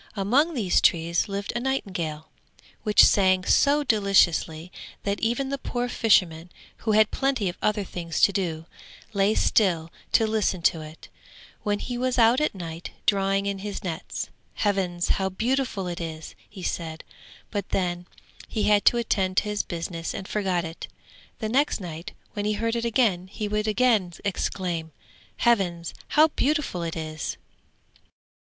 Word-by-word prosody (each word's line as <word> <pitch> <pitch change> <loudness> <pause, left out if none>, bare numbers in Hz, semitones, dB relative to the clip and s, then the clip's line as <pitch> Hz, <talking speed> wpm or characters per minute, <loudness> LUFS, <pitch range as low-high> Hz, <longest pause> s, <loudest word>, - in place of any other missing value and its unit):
Among 265 - +2
these 200 -8 +2
trees 170 +4 +2
lived 200 0 -3
a - - +1
nightingale, 185 - -3 0.5
which 210 -2 +6
sang 185 -2 +4
so 290 +1 +4
deliciously, 190 - +2 0.3
that 200 0 -1
even 240 +4 0
the 275 0 -3
poor 245 -2 -2
fisherman, 180 -8 +2 0.3
who 220 - -1
had 215 0 +5
plenty 270 -7 0
of 175 - -7
other 210 -1 +1
things 170 -3 -4
to 200 - +6
do, 165 -4 -2 0.5
lay 200 +1 +2
still 170 -6 +2 0.2
to 225 - +5
listen 215 -5 0
to 165 - +3
it, 155 +1 -11 0.5
when 205 0 0
he 245 +3 -4
was 255 0 0
out 235 +4 +5
at 305 - 0
night 165 -2 -6 0.2
drawing 195 -1 +2
in 200 -1 -2
his 205 +1 -5
nets. 175 -2 -4 0.3
'Heavens, 185 -4 0
how 190 -1 +1
beautiful 230 0 -1
it 175 0 -4
is!' 160 -1 -6 0.2
he 195 -3 -10
said, 160 -2 -4 0.5
but 200 -3 -3
then 175 -1 -1 0.4
he 215 - -2
had 205 -1 +3
to 240 - +6
attend 190 -5 0
to - - +5
his 210 -1 -1
business 170 -1 -5
and 190 - -6
forgot 185 -5 0
it. 165 +1 -7 0.5
The 220 - -3
next 270 +5 +1
night 170 -3 -7 0.2
when 205 -1 -3
he 210 - +1
heard 230 +2 -1
it 235 0 -1
again 215 -7 +2
he 210 +2 -4
would 210 +1 -1
again 215 -5 +2
exclaim, 175 -4 -2 0.4
'Heavens, 180 -8 +1
how 310 +1 +5
beautiful 295 - 0
it 165 -1 -3
is!' 155 -1 -4
195 Hz, 160 wpm, -25 LUFS, 175-225 Hz, 0.5 s, which